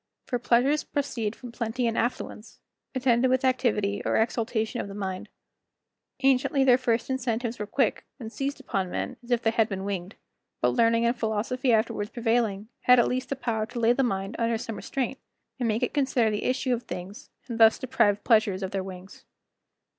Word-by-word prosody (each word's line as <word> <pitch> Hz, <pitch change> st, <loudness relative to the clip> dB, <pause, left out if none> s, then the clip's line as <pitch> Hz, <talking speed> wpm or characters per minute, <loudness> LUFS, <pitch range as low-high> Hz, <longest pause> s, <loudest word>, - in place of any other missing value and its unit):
For 245 Hz, -, -2 dB
pleasures 250 Hz, +5 st, +2 dB
proceed 235 Hz, -7 st, -2 dB
from 245 Hz, -2 st, -10 dB
plenty 235 Hz, +1 st, -2 dB
and 230 Hz, -1 st, 0 dB
affluence, 235 Hz, -2 st, -3 dB, 0.4 s
attended 250 Hz, -1 st, +3 dB
with 260 Hz, +1 st, +2 dB
activity 225 Hz, -6 st, +1 dB
or -, -, +1 dB
exultation 225 Hz, 0 st, 0 dB
of -, -, -6 dB
the 200 Hz, -, -8 dB
mind. 190 Hz, -2 st, -4 dB, 0.9 s
Anciently 270 Hz, +1 st, +3 dB
their 255 Hz, -1 st, +5 dB
first 235 Hz, -2 st, 0 dB
incentives 240 Hz, -2 st, -2 dB
were 210 Hz, -, -3 dB
quick, 235 Hz, +1 st, 0 dB, 0.2 s
and 225 Hz, -2 st, -7 dB
seized 280 Hz, +1 st, -3 dB
upon 190 Hz, -2 st, -2 dB
men -, -, -4 dB
as 240 Hz, -, -15 dB
if 240 Hz, -1 st, +1 dB
they 225 Hz, -, +3 dB
had 225 Hz, -1 st, +2 dB
been 195 Hz, -1 st, -4 dB
winged, 195 Hz, -1 st, -4 dB, 0.4 s
but -, -, +3 dB
learning 230 Hz, 0 st, +3 dB
and 235 Hz, +2 st, +2 dB
philosophy 240 Hz, +3 st, 0 dB
afterwards 215 Hz, -2 st, +1 dB
prevailing, 225 Hz, -4 st, 0 dB, 0.2 s
had 250 Hz, 0 st, +7 dB
at 240 Hz, -, +4 dB
least 255 Hz, 0 st, -2 dB
the 275 Hz, -, -1 dB
power 225 Hz, -4 st, -2 dB
to 240 Hz, -, -6 dB
lay 235 Hz, +1 st, +4 dB
the 270 Hz, -, +1 dB
mind 195 Hz, -4 st, -1 dB
under 230 Hz, 0 st, +1 dB
some 225 Hz, 0 st, -5 dB
restraint, 265 Hz, 0 st, -3 dB, 0.4 s
and 245 Hz, -, 0 dB
make 225 Hz, +2 st, 0 dB
it 245 Hz, -, -1 dB
consider 260 Hz, -6 st, +2 dB
the 210 Hz, -, -2 dB
issue 255 Hz, 0 st, +1 dB
of 240 Hz, -, -1 dB
things, 180 Hz, 0 st, -8 dB, 0.2 s
and 235 Hz, -2 st, -5 dB
thus 225 Hz, -1 st, +7 dB
deprived 225 Hz, -6 st, +1 dB
pleasures 215 Hz, -4 st, +3 dB
of 190 Hz, -, -3 dB
their 195 Hz, -1 st, -2 dB
wings. 185 Hz, 0 st, -10 dB
230 Hz, 190 wpm, -27 LUFS, 210-250 Hz, 0.9 s, had